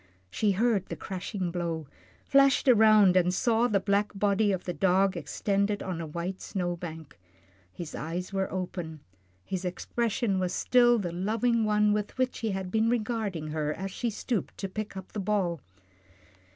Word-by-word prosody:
She 210 -2 +1
heard 210 -1 +1
the - - -5
crashing 190 -1 -4
blow, 170 -3 -3 0.4
flashed 275 -1 +4
around, 215 -5 +6
and 180 -1 +4
saw 230 +5 +2
the 205 -4 +2
black 200 +1 +1
body 205 +1 +2
of 185 -2 -2
the 175 - -3
dog 190 +3 +2
extended 200 +5 -1
on 180 -3 -4
a 160 - -5
white 170 +4 -4
snow 175 -2 -2
bank. 160 -3 -9 0.5
His 165 - -8
eyes 175 +5 -4
were 195 0 -1
open, 175 -4 -5 0.4
his 190 -1 -3
expression 205 +2 -1
was 180 -1 -1
still 240 -1 +4
the 180 -6 -2
loving 220 +6 +1
one 210 0 +3
with 210 +3 -3
which 255 0 0
he 225 - -1
had 190 -2 -3
been 220 +2 +2
regarding 215 -9 -2
her 150 -1 -2
as 190 +2 -5
she 240 +5 -2
stooped 220 -2 -3
to 195 - -3
pick 210 +1 -6
up 190 - -9
the 215 - -4
ball. 190 -6 0
195 Hz, 170 wpm, -28 LUFS, 180-215 Hz, 0.5 s, around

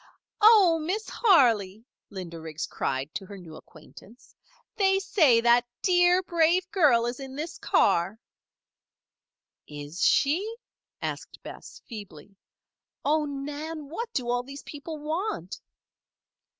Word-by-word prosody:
"Oh, 410 -7 +6
Miss 375 +8 -3
Harley!" 230 - +3 0.2
Linda 175 -4 -8
Riggs 160 -1 -5
cried 135 +2 -3
to - - -5
her 200 - -10
new 165 -4 -12
acquaintance. 175 +9 -16 0.4
"They 385 -2 +3
say 315 - +3
that 240 +1 +4 0.2
dear, 355 0 +4
brave 345 +1 +2
girl 280 - +4
is 240 +2 -4
in 270 -1 -8
this 310 +4 -6
car." 185 +6 +1 1.5
"Is 150 +3 -8
she?" 375 +11 +2 0.5
asked - - -6
Bess, - - -11
feebly. 200 - -11 0.7
"Oh, 300 +1 +2
Nan! 290 +2 -6
what 460 +9 -5
do 250 -2 -3
all 245 0 0
these 275 +3 -10
people 310 +2 -8
want?" 305 - -4
275 Hz, 120 wpm, -26 LUFS, 205-340 Hz, 1.5 s, Oh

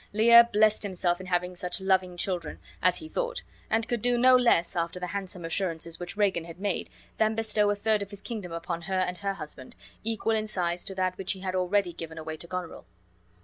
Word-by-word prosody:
Lear 235 +2 +8
blessed 215 +1 +4
himself 180 -3 0
in 185 - -9
having 180 0 0
such 180 +1 -3
loving 190 -2 +1
children, 175 -3 -2 0.2
as 180 0 +4
he 315 - -6
thought; - - -2 0.3
and 225 +1 +1
could 240 -3 -1
do 245 +1 +2
no 255 +1 +7
less, 235 -9 +3
after 170 +1 -2
the 180 - -3
handsome 190 -3 -4
assurances 165 -1 -2
which 175 +3 -6
Regan 190 -5 +1
had 170 +1 -10
made, 200 -2 -2 0.3
than 220 0 +3
bestow 215 -2 +2
a 205 - +2
third 215 0 +1
of 200 - -5
his 200 -1 -5
kingdom 200 -4 -6
upon 170 0 -4
her 190 +2 -3
and 180 -1 -1
her 195 +1 -2
husband, 150 -6 -9 0.3
equal 225 0 0
in 215 0 -1
size 175 -4 -1
to 195 - -5
that 185 -1 -1
which 195 +1 -1
he 190 - -11
had 185 -1 -3
already 185 0 +1
given 165 -1 -8
away 160 0 -5
to 170 - -6
Goneril. 180 -1 -6
190 Hz, 220 wpm, -28 LUFS, 175-215 Hz, 0.3 s, Lear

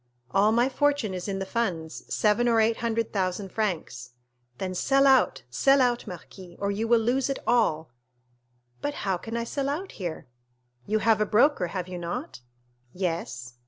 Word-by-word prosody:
"All 200 +3 +4
my 240 +3 +3
fortune 285 -5 +1
is 180 +1 -5
in 195 -1 -2
the 195 - -3
funds; 165 - -3
seven 215 +3 +2
or 230 -1 +4
eight 225 +1 +3
hundred 230 -1 -1
thousand 190 0 -1
francs." 160 - -3 0.4
"Then 185 -1 -3
sell 275 +9 +3
out—sell 260 - +3
out, 245 -2 +1
marquis, 180 0 -10
or 200 0 0
you 215 +3 -2
will 235 0 +5
lose 250 +4 +1
it 275 - -1
all." 160 - +1 0.9
0123m - - -34
"But 290 - -2
how 190 -2 -1
can 225 +6 -5
I 235 - -1
sell 275 +4 -2
out 345 +7 -3
here?" 175 -5 -6 0.6
"You 215 - +2
have 220 -2 +4
a - - +3
broker, 230 -3 +3
have 180 +1 -4
you 180 -1 -6
not?" 170 -7 -5 0.5
"Yes." 165 -9 -4
210 Hz, 175 wpm, -26 LUFS, 180-240 Hz, 0.9 s, will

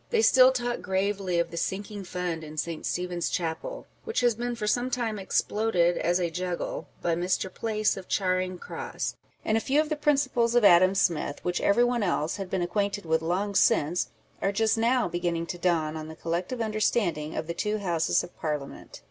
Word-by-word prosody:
They 455 -2 +2
still 260 - +7
talk 245 -2 -2
gravely 190 -1 -1
of 170 0 0
the 170 - -6
Sinking 200 +3 -3
Fund 175 -2 -3
in 155 0 -9
St. 165 +1 -3
Stephen's 175 -2 -2
Chapel, 175 - -3 0.2
which 450 - -1
has 240 -1 +4
been 240 +2 -3
for 215 - -4
some 245 +4 +1
time 230 -4 -2
exploded 190 -3 +1
as 175 +1 +1
a 170 -2 -1
juggle 180 +1 -3 0.2
by 170 - +2
Mr. 180 +2 -1
Place 215 -2 0
of 190 - -9
Charing 185 -1 0
Cross; - - -5 0.3
and 220 - +2
a - - 0
few 280 +5 +2
of 305 0 +1
the 305 - 0
principles 275 -5 +2
of 240 -3 +5
Adam 185 +1 +6
Smith, 165 -6 0
which 180 0 0
every 220 +4 +4
one 245 -1 +1
else 175 -3 0
had 195 -2 -5
been 185 -2 0
acquainted 200 +2 -1
with 160 0 +1
long 185 +5 -1
since, 175 -3 +2 0.3
are 195 - +1
just 220 +2 +2
now 235 +1 +2
beginning 175 -1 -2
to 175 +1 -6
dawn 160 -3 +1
on 155 0 -6
the 160 - -9
collec 170 +2 -2
tive 255 -2 -4
understanding 210 -8 0
of - - -2
the 170 - -4
two 210 +5 -1
Houses 175 -5 +1
of - - -11
Parliament. 150 -3 -5
185 Hz, 200 wpm, -27 LUFS, 170-225 Hz, 0.3 s, still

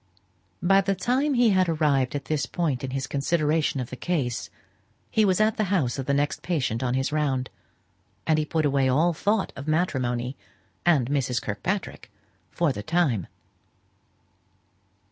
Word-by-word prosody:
By 195 +2 +5
the 195 0 0
time 260 +9 +1
he 240 -3 +4
had 185 -2 +3
arrived 145 -5 +1
at 140 - -4
this 155 -2 -1
point 150 -8 -1
in 135 - -3
his 135 0 -2
consideration 150 0 0
of 125 - -5
the - - -4
case, 135 -6 -2 0.6
he 220 - +3
was 190 -2 +3
at 215 0 +2
the 215 - +1
house 160 -10 0
of 130 - -4
the 140 - +2
next 145 +1 0
patient 135 -10 -1
on 125 -1 0
his 135 +2 0
round, 140 -4 0 0.7
and 155 -1 +3
he - - +1
put 155 0 0
away 135 -2 +2
all 160 +7 +3
thought 205 +5 0
of 140 +2 -8
matrimony 130 -6 0 0.5
and 145 -8 +4
Mrs. 130 -4 0
Kirkpatrick 180 - -4 0.4
for 170 -6 0
the 105 - -5
time. 135 - 0
150 Hz, 165 wpm, -25 LUFS, 130-175 Hz, 0.7 s, By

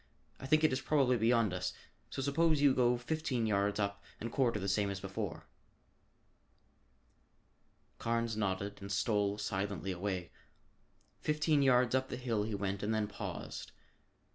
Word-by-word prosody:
"I 135 - -6
think 155 +3 +4
it 155 - +4
is 130 - -1
probably 135 -4 +3
beyond 115 -3 +3
us, 90 0 -2 0.4
so 135 - -3
suppose 155 +2 +3
you 140 -2 +5
go 125 -1 +3
fifteen 130 -2 -1
yards 100 -1 +1
up 100 -1 -2 0.2
and 115 +1 -4
quarter 120 -5 +1
the 100 - -3
same 100 +1 +1
as 100 -1 -3
before." 95 -1 -5 2.5
Carnes 115 -1 0
nodded 100 -1 -2
and 100 0 -6
stole 100 0 +1
silently 100 -2 -2
away. 90 -1 -3 0.9
Fifteen 150 -1 +2
yards 125 -2 +4
up 130 0 +1
the - - -4
hill 120 -4 -1
he 105 0 -2
went 100 0 -2
and 110 +1 0
then 110 -1 0
paused. 105 - -6
110 Hz, 150 wpm, -34 LUFS, 100-130 Hz, 2.5 s, you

